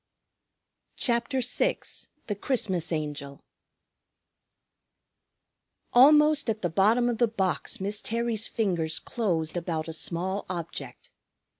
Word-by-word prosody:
CHAPTER 240 +2 0
VI 250 - +1 0.5
THE 210 - -2
CHRISTMAS 190 - -1
ANGEL 145 -3 -4 2.5
Almost 300 +2 +6
at 220 -1 -2
the 175 - 0
bottom 220 +8 +3
of 235 -2 -1
the 240 - +4
box 195 -5 -1
Miss 205 +2 -1
Terry's 230 -1 -1
fingers 175 -8 0
closed 175 -9 -2
about 165 -2 -2
a 160 - -5
small 185 +5 -2
object. 170 -2 -6
200 Hz, 105 wpm, -27 LUFS, 170-235 Hz, 2.5 s, Almost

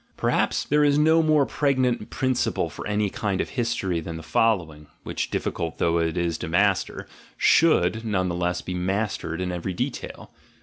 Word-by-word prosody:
Per - - 0
haps - - +1
there 150 +1 +2
is 145 -1 +4
no 160 +2 +5
more 155 -3 +3
pregnant 130 -7 0
principle 130 -2 -1
for - - -7
any 105 0 +1
kind 100 -3 -2
of - - -2
history 115 -8 -1
than 80 0 -6
the 80 - -9
following, 80 -7 0 0.2
which, - - -3
difficult 80 -1 -3
though 85 0 +1
it 80 +1 -1
is 85 -2 -1
to 90 - -4
master, 95 +3 +1 0.3
should 110 - +3
none 100 -5 0
the 85 - -2
less 90 0 -1
be 90 - -5
mastered 90 -2 -2
in 90 0 -2
every 90 +1 -4
detail. - - -5
95 Hz, 180 wpm, -24 LUFS, 85-125 Hz, 0.3 s, no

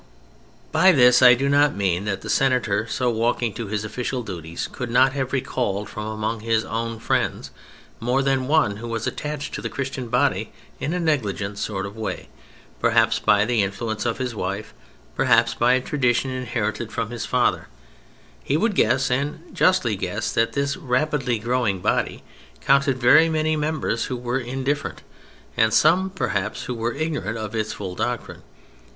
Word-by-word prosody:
By 190 - +6
this 125 -3 +6
I 125 -1 +9
do 135 +3 -1
not 145 +1 +3
mean 95 -1 0
that 100 -2 -2
the - - -8
Senator 115 -5 +1
so 125 +1 0
walking 115 0 0
to 115 +2 -5
his 105 +1 -3
official 125 +3 -3
duties 85 -5 -5
could 125 - -5
not 130 +2 +4
have 135 -2 -2
recalled 125 -6 -2
from 105 0 -6
among 110 +1 -3
his 110 0 0
own 115 0 -3
friends - - -1 0.5
more 125 +4 +1
than 135 -1 +1
one 145 -9 +2
who 120 +2 -7
was 115 -1 -3
attached 150 -1 -4
to - - -4
the - - -4
Christian 130 -2 -4
body - - +1 0.3
in 155 - -2
a - - -1
negligent 105 - -1
sort 100 -2 -3
of 100 +1 -8
way, 110 -1 -5 0.5
perhaps 115 -1 +3
by 105 0 +3
the 120 -1 +1
influence 110 +3 -3
of 115 - -1
his 130 -2 -3
wife, 100 0 -4 0.4
perhaps 115 -3 +3
by 120 +1 +3
a 130 - +2
tradition 130 -1 0
inherited 120 -3 -3
from 115 -1 -3
his 120 - -4
father: 125 -1 +1 0.8
he 145 - +1
would 220 +5 +1
guess, 135 - +2
and 145 +6 -3
justly 185 - +2
guess, 100 +4 -3
that 115 0 +1
this 140 +2 -1
rapidly 130 -4 0
growing 115 -3 0
body - - -1 0.4
counted 140 -2 +3
very 130 +6 +6
many 155 0 +1
members 150 -6 -1
who 125 - -4
were 120 +1 -2
indifferent 135 +3 -3 0.5
and 110 -2 +3
some, 180 +5 +4
perhaps, 185 -8 -2
who 125 - -4
were 115 0 -2
ignorant 145 - -2
of 110 -1 -5
its 110 -1 -2
full 95 -3 -6
doctrine. - - -4
120 Hz, 170 wpm, -23 LUFS, 110-135 Hz, 0.8 s, I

